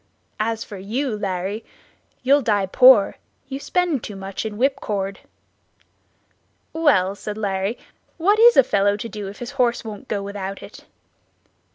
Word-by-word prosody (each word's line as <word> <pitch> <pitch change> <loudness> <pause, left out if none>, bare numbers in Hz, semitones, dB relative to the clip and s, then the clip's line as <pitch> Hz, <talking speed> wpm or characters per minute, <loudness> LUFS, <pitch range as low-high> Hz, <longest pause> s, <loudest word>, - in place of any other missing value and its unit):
As 225 +1 -1
for 205 -3 -9
you, 230 +5 -2
Larry, 200 +1 -3 0.6
you'll 280 +3 +4
die 205 -5 +1
poor; 250 +1 +6 0.3
you 270 0 -4
spend 340 -4 0
too 205 - -7
much 195 +2 -5
in 210 -1 -7
whipcord." 205 -7 -1 1.5
"Well," 270 - +3
said 210 +1 -7
Larry, 200 +1 -2 0.4
"what 400 +6 +3
is 475 +1 +7
a 270 - +8
fellow 200 -3 +1
to 220 - -5
do 210 -3 -6
if 200 - -9
his 245 +1 -7
horse 240 -1 +1
won't 215 +2 -8
go 205 -4 -2
without 200 -1 -6
it?" - - -13
210 Hz, 150 wpm, -22 LUFS, 200-260 Hz, 1.5 s, a